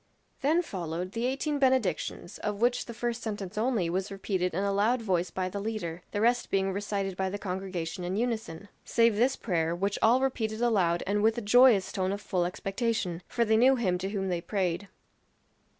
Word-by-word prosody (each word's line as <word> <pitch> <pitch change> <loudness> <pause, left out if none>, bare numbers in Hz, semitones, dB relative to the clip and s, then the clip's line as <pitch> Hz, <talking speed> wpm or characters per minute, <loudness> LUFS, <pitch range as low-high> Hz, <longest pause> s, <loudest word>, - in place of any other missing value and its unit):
Then 315 +6 +3
followed 180 - -4
the 230 +3 -1
eighteen 285 +3 -1
benedictions, 230 - 0
of 210 -1 -3
which 245 +2 +2
the 235 - -6
first 240 +1 -2
sentence 205 -3 -5
only 220 -4 +1
was 185 +4 -2
repeated 190 -3 -2
in 195 - 0
a 200 0 +1
loud 220 +6 +2
voice 185 -5 0
by 185 +1 -2
the 200 +2 -4
leader, 200 -6 -4
the 205 - -3
rest 240 +2 +2
being 195 0 +1
recited 200 -1 -2
by 190 0 -1
the 200 - -4
congregation 185 -2 -4
in 180 +2 -2
unison. 220 -6 -3 0.2
Save 230 -2 +3
this 250 +5 +2
prayer, 170 -5 -1
which 200 +3 -1
all 235 +3 +5
repeated 225 -5 -1
aloud 190 -8 +2
and 205 +2 0
with 220 +2 +3
a - - -1
joyous 225 -2 +5
tone 190 -2 -1
of 200 - -3
full 185 -4 -1
expectation; 195 -1 -2
for 235 - 0
they 220 0 +3
knew 260 +4 +6
him 185 -8 0
to 190 +1 -3
whom 195 -2 -2
they 175 -2 -1
prayed. 190 0 -2
200 Hz, 200 wpm, -29 LUFS, 185-230 Hz, 0.2 s, knew